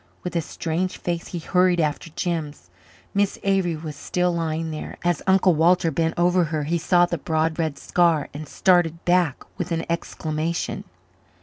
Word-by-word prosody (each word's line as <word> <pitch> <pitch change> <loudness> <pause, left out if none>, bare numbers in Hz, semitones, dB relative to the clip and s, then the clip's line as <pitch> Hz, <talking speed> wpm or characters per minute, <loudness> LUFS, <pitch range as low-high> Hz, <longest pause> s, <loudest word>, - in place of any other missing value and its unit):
With 180 - -5
a 170 - +2
strange 170 +3 -3
face 170 -1 -3
he 175 - -5
hurried 180 +1 +2
after 155 +1 -1
Jims. 150 - -3 0.4
Miss 200 0 +1
Avery 190 -4 +1
was 155 -1 -7
still 180 +4 0
lying 165 -1 -2
there. 155 - -6
As 175 -3 +1
Uncle 190 -1 +5
Walter 165 +1 +3
bent 165 +2 0
over 175 0 +3
her 155 -1 -2
he 170 +4 0
saw 175 +1 +4
the 170 -2 -3
broad 160 +2 0
red 155 -4 -1
scar 170 -3 +2
and 150 +1 -7
started 175 -3 +2
back 175 -5 +2 0.2
with 180 0 -3
an 165 0 -1
exclamation. 165 0 -3
170 Hz, 170 wpm, -23 LUFS, 155-180 Hz, 0.4 s, Uncle